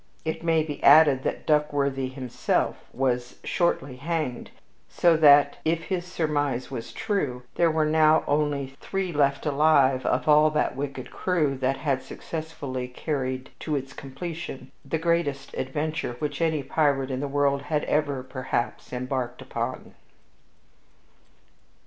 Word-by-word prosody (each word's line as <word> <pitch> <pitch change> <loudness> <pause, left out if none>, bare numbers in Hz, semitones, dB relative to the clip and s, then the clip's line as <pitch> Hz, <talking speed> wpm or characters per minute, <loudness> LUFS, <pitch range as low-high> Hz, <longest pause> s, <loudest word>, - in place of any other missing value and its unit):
It 160 - -2
may 165 -2 +3
be 150 -2 -6
added 145 -2 +7
that - - -3
Duckworthy 140 -3 +1
himself 130 -2 -1 0.2
was 125 -1 -1
shortly 140 -7 0
hanged, 155 -3 -3 0.4
so 170 -2 +4
that, 145 -2 +6
if 165 +1 0
his 180 -1 -3
surmise 145 -7 -1
was 115 - -6
true, 145 - -2
there 170 -1 +3
were 155 -1 +1
now 155 0 +4
only 145 -2 0
three 195 -2 -2
left 140 -1 +1
alive 140 -3 +3
of 125 +2 0
all 150 0 +6
that 150 -3 0
wicked 135 -2 -5
crew 160 -7 0
that 135 +1 0
had 135 -4 -1
successfully 140 -2 -6
carried 130 -1 -3
to 155 - -2
its 135 0 -4
completion 135 -1 -7
the 140 +4 -2
greatest 165 -4 -1
adventure 145 -1 -3
which 150 +4 -3
any 160 -3 +1
pirate 140 -3 +1
in 130 - -2
the 145 - -2
world 140 0 +1
had 150 +1 -1
ever, 145 -3 0
perhaps, 130 -2 -3
embarked 125 -1 -3
upon. - - -5
145 Hz, 135 wpm, -26 LUFS, 130-155 Hz, 0.4 s, added